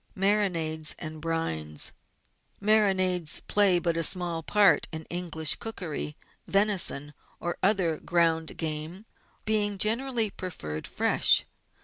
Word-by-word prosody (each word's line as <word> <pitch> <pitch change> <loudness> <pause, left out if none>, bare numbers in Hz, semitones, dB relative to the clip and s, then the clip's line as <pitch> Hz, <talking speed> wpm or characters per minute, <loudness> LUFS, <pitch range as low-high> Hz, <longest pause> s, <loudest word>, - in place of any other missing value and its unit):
Marinades 180 -6 +1
and 155 -2 -7
Brines. 80 - -2 0.7
Marinades 190 -5 +2
play 200 -3 +3
but 170 -1 0
a 165 - 0
small 170 0 0
part 200 +3 +3
in 160 -1 -5
English 170 -3 +1
cookery, 170 -9 -5 0.3
venison 195 -8 +2 0.3
or 175 - -4
other 185 -5 +1
ground 165 -2 0
game 160 +5 -4 0.4
being 210 -2 +1
generally 225 +1 +1
preferred 80 - -6
fresh. - - +3
175 Hz, 105 wpm, -27 LUFS, 160-200 Hz, 0.7 s, play